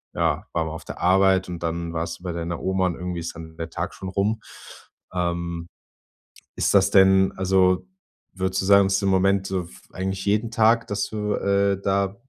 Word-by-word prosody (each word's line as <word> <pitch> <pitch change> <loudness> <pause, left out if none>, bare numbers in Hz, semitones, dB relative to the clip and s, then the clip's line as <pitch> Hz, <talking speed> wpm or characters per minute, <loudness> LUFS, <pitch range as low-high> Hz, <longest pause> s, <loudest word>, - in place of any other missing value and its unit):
ja, - - 0
war 85 - +1
man 80 - -5
auf 80 - -9
der - - -8
Arbeit 95 +1 +3
und 85 -1 -6
dann 85 0 -3
warst 80 +1 -3
du - - -20
bei 90 - -3
deiner 85 0 -4
Oma 95 0 0
und 85 - -2
irgendwie 90 -1 -4
ist 85 0 -6
dann 80 0 -10
der 80 0 -5
Tag - - -4
schon 95 - -8
rum. 105 +4 0 0.7
Ähm, 85 -1 -2 0.9
ist - - +1
das 100 -1 +5
denn 95 0 +5
also, 95 -1 +2 0.5
würdest 95 0 -1
du - - -3
sagen, 100 0 +6
dass 95 +1 +1
im 100 - +1
Moment 95 +1 +2
so 95 -2 -2
f 65 -7 -15
eigentlich 95 +1 -4
jeden 105 +3 +1
Tag, 115 0 +3
dass 100 0 -2
du, 105 -1 -2
äh, 100 0 +1
da 100 0 0
95 Hz, 200 wpm, -24 LUFS, 85-100 Hz, 0.9 s, sagen